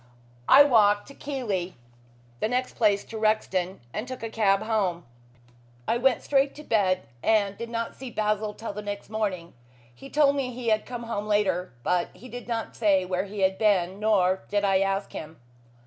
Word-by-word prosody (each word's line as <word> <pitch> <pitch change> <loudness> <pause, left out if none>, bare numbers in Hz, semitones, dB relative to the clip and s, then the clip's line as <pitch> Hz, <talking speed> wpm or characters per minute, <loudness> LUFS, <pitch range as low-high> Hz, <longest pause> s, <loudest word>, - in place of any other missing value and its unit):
I 285 - +10
walked 210 -6 +4
to - - -11
Keighley, 220 -12 -3 0.6
the - - +1
next 250 +2 -1
place 205 -4 +2
to 225 - -8
Rexton, 190 - 0
and 220 - -4
took 255 -2 -7
a 225 - -4
cab 195 -3 +2
home. 195 -6 -1 0.8
I 235 - +1
went 265 0 +2
straight 275 0 +2
to 300 - -10
bed, 190 -7 +1 0.2
and 205 -3 +2
did 230 +2 -6
not 230 -1 -3
see 260 -1 -8
Basil 210 -1 -1
till 225 - -6
the 210 - -5
next 205 0 -6
morning. 195 -6 -3 0.4
He 275 - -12
told 285 -1 +3
me 270 -3 -1
he 240 -1 -3
had 215 -1 +1
come 245 -1 -6
home 215 -3 -4
later, 190 -4 +1
but 180 +4 +1
he 235 +8 -12
did 245 0 -8
not 230 -2 -3
say 195 -4 +3
where 185 +1 -1
he 200 0 -6
had 190 0 +2
been, 195 -3 +2
nor 190 -3 +2
did 205 0 +1
I 195 -1 +3
ask 195 +1 -1
him." 155 +1 -8
210 Hz, 190 wpm, -26 LUFS, 195-235 Hz, 0.8 s, I